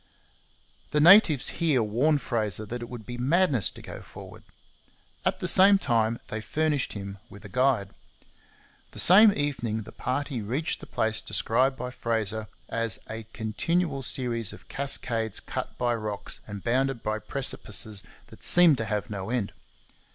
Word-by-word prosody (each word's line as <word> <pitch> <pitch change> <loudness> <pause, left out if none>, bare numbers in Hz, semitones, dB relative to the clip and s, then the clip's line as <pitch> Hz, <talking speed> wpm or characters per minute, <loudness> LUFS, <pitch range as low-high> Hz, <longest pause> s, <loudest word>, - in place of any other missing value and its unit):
The 150 - +1
natives 160 - +6
here 145 -8 +2
warned 135 +8 +1
Fraser 110 -3 -1
that 120 +3 -6
it 120 - -7
would 120 -4 -9
be 120 0 -7
madness 140 - +2
to - - -14
go - - -9
forward. - - -12 0.8
At - - -1
the - - -1
same 195 +2 +7
time 115 - 0
they 110 - -4
furnished 150 +2 -1
him 100 -1 -7
with 100 0 -13
a - - -9
guide. 125 -4 +1 1.0
The - - -12
same 205 +4 +8
evening 120 - -2
the - - -12
party 130 -1 -3
reached 130 +10 -3
the - - -12
place 110 -1 -1
described 130 +4 0
by 125 -1 -5
Fraser 110 -3 -2 0.2
as 115 -3 -2
'a 110 -1 -8
continual 140 +8 -2
series 115 -3 -2
of - - -15
cascades 115 -5 -1
cut - - -6
by 120 -1 0
rocks 105 -3 -4
and 100 -2 -8
bounded 130 +1 0
by 110 0 -2
precipices 110 -5 +1 0.3
that - - -14
seemed 170 -7 +6
to 110 - -2
have 105 +1 -3
no 100 0 -5
end.' 115 -5 -2
120 Hz, 160 wpm, -26 LUFS, 110-140 Hz, 1.0 s, same